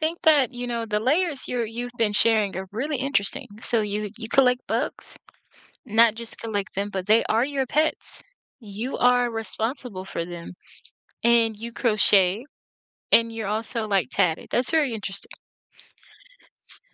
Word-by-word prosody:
Think 320 +2 -2
that, 295 -7 +4
you 245 0 -5
know, 235 -1 -2
the 210 -2 -1
layers 290 +5 +1
you're 245 -2 -1
you've 240 +2 -5
been 225 -3 +1
sharing 210 -3 +2
are 190 0 -4
really 280 +7 -2
interesting, 265 -6 0
so 230 -1 +2
you 210 0 -3
you 225 -1 -6
collect 250 0 +3
bugs? - - -3 0.7
Not 225 -1 +5
just 230 0 -9
collect 205 -3 -4
them, 200 +1 -2
but 190 -2 -4
they 220 +2 +5
are 225 +2 +2
your 275 -1 -1
pets. 310 +5 -1 0.4
You 220 +3 -5
are 245 -1 +4
responsible 225 -2 -4
for 170 - -4
them, 170 0 -8 0.7
and 230 -2 +4
you 235 +1 -6
crochet, 210 -2 +3 0.7
and 230 0 +5
you're 225 -2 -4
also, 220 +2 -2
like, 195 -10 +1
tatted, 160 +1 0
that's 245 +1 +2
very 305 -6 +2
interesting. 200 -2 -5 1.3
S - - -1
230 Hz, 155 wpm, -24 LUFS, 210-250 Hz, 1.3 s, Not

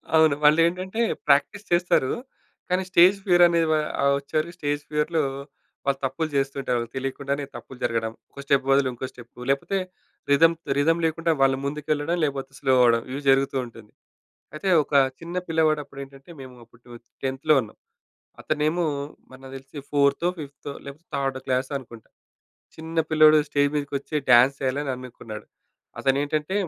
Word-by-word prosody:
అవును. 160 -3 +5
వాళ్ళు 150 +2 +6
ఏంటంటే 185 +5 -3 0.3
ప్రాక్టీస్ 150 +9 +2
చేస్తారు. 175 -6 +2 0.6
కానీ 185 +1 +1
స్టేజ్ 185 +2 +6
ఫియర్ 175 -2 +5
అనే 170 -1 +1
వా 155 - +3 0.2
ఆహ్, 140 0 +3
వచ్చారు. 155 +4 -2
స్టేజ్ 145 -2 -2
ఫియర్‌లో 155 +2 0 0.6
వాళ్ళు 135 -1 0
తప్పులు 135 +5 -2
జేస్తుంటారు. 135 -2 -1
వాళ్ళకి 115 +1 -6
తెలియకుండానే 140 +2 -3
తప్పులు 125 +2 -10
జరగడం. 115 -1 -1 0.2
ఒక - - -13
స్టెప్ 140 -2 +2
బదులు 135 -1 +4
ఇంకో 130 +2 -5
స్టెపు. 120 -1 -16
లేపోతే 140 +8 -1 0.5
రిథమ్ 165 +4 +5 0.2
రిథమ్ 165 +4 +2
లేకుండా 165 +1 0
వాళ్ళు 135 -1 +4
ముందుకెళ్లడం 150 +2 -1
లేకపోతే 140 -2 -2
స్లో 130 - +2
అవ్వడం 115 -1 +4
ఇవి 140 +2 -4
జరుగుతూ 135 0 +3
ఉంటుంది. 115 -3 -14 0.6
అయితే 185 +5 -3
ఒక 145 - -14 0.3
చిన్న 170 +2 -8
పిల్లవాడు 160 -2 +2
అప్పుడు 140 0 -13
ఏంటంటే 135 +4 -15
మేము 130 -1 -11
అప్పుడు 115 +1 -23
12త్ 120 -1 -14 0.2
టెన్త్‌లో 135 +3 +1
ఉన్నాం. 110 - -11 0.6
అతనేమో 155 +3 0 0.5
మరి 130 - -14
నాకు 135 - -10
తెలిసి 135 +3 -13
ఫోర్తో 140 +3 +2
ఫిఫ్తో 145 -1 -8
లేకపోతే 145 +5 -11
థర్డ్ 135 -1 -1
క్లాస్ 130 0 0
అనుకుంటా. 115 -4 -13 0.7
చిన్న 160 +1 -2
పిల్లోడు 155 0 +6
స్టేజ్ 145 0 +2
మీదకి 145 -1 -3
వచ్చి 145 - -11 0.2
డ్యాన్స్ 125 +3 +7
చేయాలని 135 +2 -1
అనుకున్నాడు. 115 -4 -10 0.5
అతను 135 0 +1
ఏంటంటే 155 +4 -2
140 Hz, 155 wpm, -24 LUFS, 135-155 Hz, 0.7 s, డ్యాన్స్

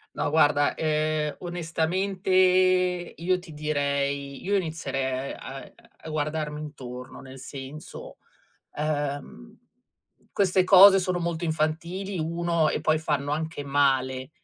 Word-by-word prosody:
No, - - -1
guarda, 145 -1 +3
ehm, 155 -1 0
onestamente 175 +3 -2 0.9
io 180 +2 0
ti 175 -3 -12
direi 140 -2 -2
io 200 +2 +1
inizierei 135 -6 -3
a 135 0 -8 0.4
a 160 - -7
guardarmi 150 0 -2
intorno, 125 -4 -8
nel 130 0 -11
senso, 135 +3 -9 0.6
ehm, 145 - -3 0.8
queste 185 -2 +2
cose 195 +1 +9
sono 185 -1 -1
molto 170 -1 -2
infantili, 170 +5 -2
1, 170 0 0
e - - -2
poi 155 +1 +2
fanno 145 -2 -1
anche 155 -1 -3
male 135 -2 +1
155 Hz, 110 wpm, -26 LUFS, 140-170 Hz, 0.9 s, cose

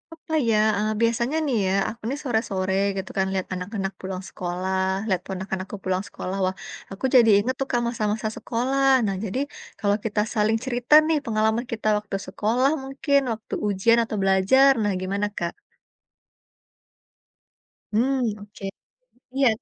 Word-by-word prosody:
Apa 320 0 -9 0.2
ya, 220 - +3 0.2
eee, 215 +1 0
biasanya 235 +5 +1
nih 265 -5 +1
ya - - +1 0.2
aku 235 - -10
nih 280 +2 -3
sore-sore 220 -7 -1 0.2
gitu 190 0 -4
kan 190 - +3
lihat 190 -1 -2
anak-anak 195 +1 -4
pulang 190 0 -5
sekolah 185 +1 -2 0.3
lihat 185 -4 +1
ponakan 190 0 -4
aku 195 - -8
pulang 185 0 0
sekolah 185 - -5
wah 185 +1 -1 0.4
aku 195 +6 -4
jadi 235 -3 +7
inget 245 +6 0
tuh 270 - -1
Kak, 240 - +2
masa-masa 220 -2 -1
sekolah 260 +4 0 0.2
nah 195 -2 -1
jadi 210 +5 -2 0.4
kalau 205 0 +2
kita 210 -1 +1
saling 215 +1 +2
cerita 245 +1 0
nih 320 -1 +3
pengalaman 220 +1 +1
kita 220 -1 -3
waktu 210 -1 -5
sekolah 230 +8 +1
mungkin 280 +1 +1
waktu 220 -1 -6
ujian 205 +4 +3
atau 225 - -4
belajar 195 +9 +5
nah 205 - +1
gimana 200 +2 -1
Kak? 170 0 -1 2.4
Mmm, 255 +4 +2 0.2
oke, 205 0 -13 0.7
iya. 270 -1 +4
215 Hz, 155 wpm, -24 LUFS, 190-245 Hz, 2.4 s, jadi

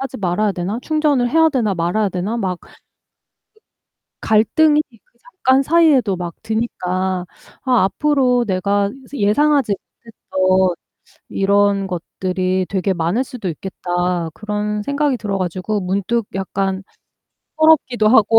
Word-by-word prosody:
하지 270 -1 -5
말아야 200 +2 0
되나? 190 +5 -3
충전을 295 -6 +1
해야 320 +3 +5
되나, 235 -9 0
말아야 180 +5 0
되나?' 190 +5 -3
막 190 -6 -2
그 - - -19 1.5
갈등이 295 +8 +3 0.2
그 - - -38
잠깐 275 - +1
사이에도 295 - +3
막 175 -1 -5
드니까 185 -5 -2 0.4
'아 250 -7 +3
앞으로 255 +1 +2
내가 200 +1 0 0.2
예상하지 275 +2 +2
못했던 190 -4 -1 0.5
이런 200 0 +2
것들이 185 +1 -2
되게 195 0 0
많을 175 +7 0
수도 240 -7 -6
있겠다.' 175 0 -2
그런 210 0 -3
생각이 280 +2 0
들어 205 -3 -3
가지고 185 +3 -2
문득 200 +4 -1
약간 195 0 -2 0.7
서럽기도 300 -8 +3
하고 225 -1 +5
205 Hz, 270 characters per minute, -19 LUFS, 185-250 Hz, 1.5 s, 해야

